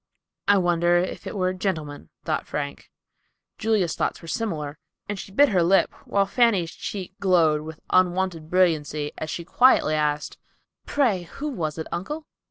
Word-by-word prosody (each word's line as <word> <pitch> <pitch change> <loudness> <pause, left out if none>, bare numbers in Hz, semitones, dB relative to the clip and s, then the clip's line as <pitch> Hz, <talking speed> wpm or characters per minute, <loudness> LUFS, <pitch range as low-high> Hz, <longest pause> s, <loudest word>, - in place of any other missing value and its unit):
"I 205 0 +6
wonder 175 -1 +3
if 180 +1 -2
it - - -5
were 185 -2 +1
a - - -2
gentleman," 155 - -4 0.2
thought - - -1
Frank. - - -5 0.7
Julia's 215 -7 +1
thoughts - - -1
were 165 - -12
similar, 155 -8 -3 0.3
and 205 -1 -4
she - - -8
bit 280 +7 +5
her 185 -4 +3
lip, 185 +3 +3
while 200 0 +2
Fanny's 200 -6 +2
cheek 190 -2 -6
glowed 165 -6 +3
with 155 0 -9
unwonted 180 -3 +1
brilliancy 155 -5 +1
as 155 - -4
she 170 +2 -4
quietly 250 -8 +4
asked, 150 -1 -1 0.5
"Pray, 210 - +1
who 300 - -4
was 160 - -3
it 160 - -4
uncle?" 295 - -4
180 Hz, 165 wpm, -24 LUFS, 160-200 Hz, 0.7 s, I